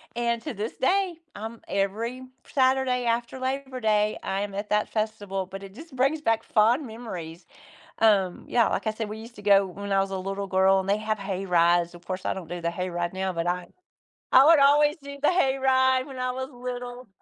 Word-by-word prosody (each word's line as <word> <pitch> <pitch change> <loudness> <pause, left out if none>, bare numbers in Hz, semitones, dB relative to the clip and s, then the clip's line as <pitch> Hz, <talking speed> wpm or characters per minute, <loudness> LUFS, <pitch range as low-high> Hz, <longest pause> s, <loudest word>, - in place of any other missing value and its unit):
And 235 -1 0
to 300 - -4
this 215 +3 -5
day, 375 +5 +2 0.2
I'm 225 +2 -7
every 225 +6 -2 0.3
Saturday 260 -2 +2
after 235 +2 -1
Labor 265 0 -3
Day, 215 -2 +2
I 195 +1 -2
am 205 -1 -4
at 205 +1 -4
that 210 0 +2
festival, 205 -3 -2
but 195 +1 -8
it 195 0 -10
just 315 +1 -12
brings 275 +4 +1
back 225 -4 +1
fond 235 +7 +3
memories. 180 -8 -8 0.6
Um, 200 -5 +3
yeah, 235 -2 +3
like - - -2
I - - +3
said, 220 -1 -4
we 215 - -6
used 230 +2 -11
to 205 - -11
go 200 -1 +5
when 200 +2 -7
I 195 - +4
was 195 0 -1
a 190 - -3
little 195 +1 -4
girl 190 +1 +4
and 190 - -6
they 200 - +3
have 215 0 -2
hay 195 -1 -4
rides, 175 0 +3
of 175 0 -13
course, 185 0 -4
I - - 0
don't 180 -4 -8
do 175 0 -4
the 170 0 -1
hay 180 +1 -4
ride 175 0 -2
now, 190 0 -1
but 170 0 -2
I 180 0 -2 0.7
I 260 - +9
would 325 -2 +7
always 295 +2 +5
do 280 0 -8
the 295 - +4
hay 270 -7 +2
ride 260 -1 +3
when 265 -3 -9
I 255 0 0
was 260 +1 -5
little, 245 0 -7
220 Hz, 225 wpm, -26 LUFS, 195-255 Hz, 0.7 s, I